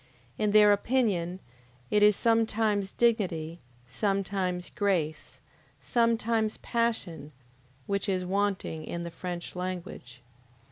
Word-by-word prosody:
In 210 Hz, -1 st, +2 dB
their 210 Hz, 0 st, +7 dB
opinion 200 Hz, -6 st, 0 dB, 0.5 s
it 210 Hz, -, +3 dB
is 210 Hz, 0 st, +6 dB
sometimes 220 Hz, -3 st, +1 dB
dignity, 180 Hz, -9 st, 0 dB, 0.3 s
sometimes 190 Hz, -, -2 dB
grace, 180 Hz, -8 st, -1 dB, 0.4 s
sometimes 230 Hz, -2 st, +1 dB
passion, 200 Hz, -11 st, -2 dB, 0.5 s
which 200 Hz, +1 st, -1 dB
is 185 Hz, -1 st, 0 dB
wanting 195 Hz, -4 st, -1 dB
in 170 Hz, +2 st, -5 dB
the 170 Hz, -, -6 dB
French 175 Hz, +1 st, -6 dB
language. 175 Hz, -9 st, -6 dB
195 Hz, 100 wpm, -28 LUFS, 175-215 Hz, 0.5 s, their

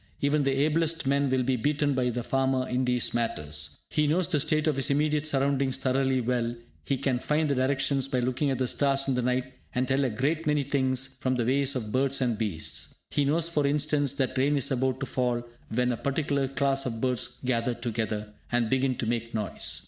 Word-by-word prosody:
Even 145 Hz, +1 st, +2 dB
the 135 Hz, 0 st, +2 dB
ablest 165 Hz, 0 st, +1 dB
men 140 Hz, +1 st, +2 dB
will 130 Hz, -1 st, +2 dB
be 130 Hz, +1 st, +1 dB
beaten 145 Hz, +4 st, +1 dB
by 125 Hz, -1 st, +1 dB
the 120 Hz, 0 st, -3 dB
farmer 130 Hz, 0 st, +1 dB
in 125 Hz, +1 st, 0 dB
these 125 Hz, -1 st, 0 dB
matters. 75 Hz, -10 st, -2 dB
He 150 Hz, -1 st, +2 dB
knows 165 Hz, +3 st, +2 dB
the 165 Hz, -5 st, +1 dB
state 155 Hz, +1 st, +1 dB
of 155 Hz, -3 st, +1 dB
his 135 Hz, -, +1 dB
immediate 150 Hz, +1 st, +1 dB
surroundings 135 Hz, -2 st, +1 dB
thoroughly 130 Hz, 0 st, +1 dB
well, 120 Hz, -1 st, -1 dB, 0.3 s
he 135 Hz, -, -1 dB
can 130 Hz, -2 st, 0 dB
find 150 Hz, +4 st, +1 dB
the 140 Hz, -, +1 dB
directions 135 Hz, 0 st, +1 dB
by 130 Hz, -2 st, 0 dB
looking 130 Hz, +4 st, 0 dB
at 135 Hz, -, 0 dB
the 130 Hz, 0 st, 0 dB
stars 135 Hz, +1 st, +1 dB
in 135 Hz, -, +2 dB
the 125 Hz, -, 0 dB
night, 125 Hz, +1 st, -1 dB, 0.2 s
and 125 Hz, +1 st, +1 dB
tell 135 Hz, +1 st, +2 dB
a 130 Hz, -, +1 dB
great 150 Hz, +8 st, -1 dB
many 150 Hz, -1 st, +2 dB
things 130 Hz, -1 st, +1 dB
from 130 Hz, 0 st, 0 dB
the 120 Hz, -2 st, 0 dB
ways 135 Hz, +2 st, +2 dB
of 110 Hz, -4 st, -3 dB
birds 135 Hz, +2 st, +2 dB
and 120 Hz, -5 st, 0 dB
beasts. 100 Hz, -8 st, -3 dB, 0.2 s
He 145 Hz, -, +1 dB
knows, 160 Hz, +4 st, +1 dB
for 150 Hz, -4 st, +1 dB
instance, 145 Hz, -1 st, +1 dB
that 135 Hz, -2 st, -1 dB
rain 145 Hz, +2 st, +3 dB
is 135 Hz, -, 0 dB
about 130 Hz, 0 st, 0 dB
to -, -, -1 dB
fall 125 Hz, -2 st, -1 dB, 0.3 s
when 125 Hz, +2 st, +1 dB
a 120 Hz, -, -2 dB
particular 140 Hz, 0 st, 0 dB
class 135 Hz, 0 st, 0 dB
of 115 Hz, -2 st, -4 dB
birds 125 Hz, 0 st, -1 dB
gather 120 Hz, -1 st, 0 dB
together, 110 Hz, -3 st, -3 dB, 0.2 s
and 120 Hz, -2 st, +1 dB
begin 130 Hz, -1 st, +2 dB
to 120 Hz, -, -3 dB
make 115 Hz, 0 st, -2 dB
noise. 105 Hz, -2 st, -3 dB
130 Hz, 215 wpm, -27 LUFS, 125-140 Hz, 0.3 s, rain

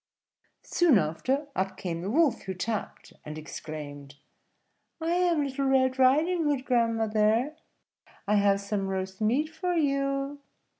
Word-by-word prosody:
Soon 335 Hz, -9 st, +4 dB
after, 225 Hz, -, 0 dB
up 190 Hz, +1 st, -2 dB
came 170 Hz, -2 st, -4 dB
the 190 Hz, -, -3 dB
Wolf, 300 Hz, +3 st, +2 dB
who 190 Hz, -1 st, -5 dB
tapped, 215 Hz, +3 st, -4 dB
and 150 Hz, 0 st, -7 dB
exclaimed, 145 Hz, -2 st, -8 dB, 0.8 s
"I 325 Hz, +1 st, -1 dB
am 345 Hz, -3 st, +2 dB
Little 275 Hz, 0 st, -2 dB
Red 260 Hz, -1 st, +2 dB
Riding 310 Hz, +6 st, +3 dB
Hood, 280 Hz, -3 st, 0 dB
grandmother; 225 Hz, +2 st, +2 dB, 0.7 s
I 210 Hz, +1 st, +3 dB
have 200 Hz, -1 st, +3 dB
some 200 Hz, -1 st, -2 dB
roast 190 Hz, +1 st, -4 dB
meat 255 Hz, +9 st, +1 dB
for 355 Hz, +2 st, -2 dB
you." 275 Hz, -2 st, 0 dB
245 Hz, 135 wpm, -28 LUFS, 195-285 Hz, 0.8 s, Soon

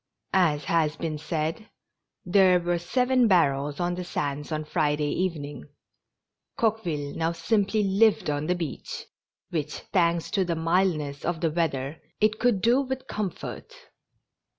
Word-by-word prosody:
As 160 Hz, -6 st, +3 dB
has 155 Hz, 0 st, +1 dB
been 160 Hz, -3 st, -3 dB
said, 160 Hz, +6 st, -3 dB, 0.6 s
there 185 Hz, 0 st, +5 dB
were 175 Hz, 0 st, 0 dB
seven 250 Hz, +7 st, +2 dB
barrels 145 Hz, -6 st, +2 dB
on 175 Hz, 0 st, 0 dB
the 180 Hz, +1 st, -4 dB
sands 145 Hz, -3 st, -3 dB
on 155 Hz, 0 st, -2 dB
Friday 150 Hz, -1 st, 0 dB
evening. 145 Hz, -, -3 dB, 0.9 s
Coqueville 175 Hz, -11 st, -1 dB
now 165 Hz, +1 st, 0 dB
simply 205 Hz, +4 st, +1 dB
lived 200 Hz, +2 st, +3 dB
on 145 Hz, 0 st, -1 dB
the 180 Hz, -, +2 dB
beach, 165 Hz, -5 st, -5 dB, 0.5 s
which, 150 Hz, -3 st, -3 dB
thanks 170 Hz, -3 st, +2 dB
to 195 Hz, -, +2 dB
the 170 Hz, -2 st, -1 dB
mildness 160 Hz, -4 st, 0 dB
of 170 Hz, -1 st, -1 dB
the 165 Hz, -2 st, +1 dB
weather, 150 Hz, -3 st, -2 dB, 0.2 s
it 215 Hz, +1 st, +2 dB
could 240 Hz, -6 st, +2 dB
do 240 Hz, +4 st, +4 dB
with 265 Hz, -1 st, -4 dB
comfort. 215 Hz, -, -5 dB
170 Hz, 140 wpm, -26 LUFS, 150-195 Hz, 0.9 s, there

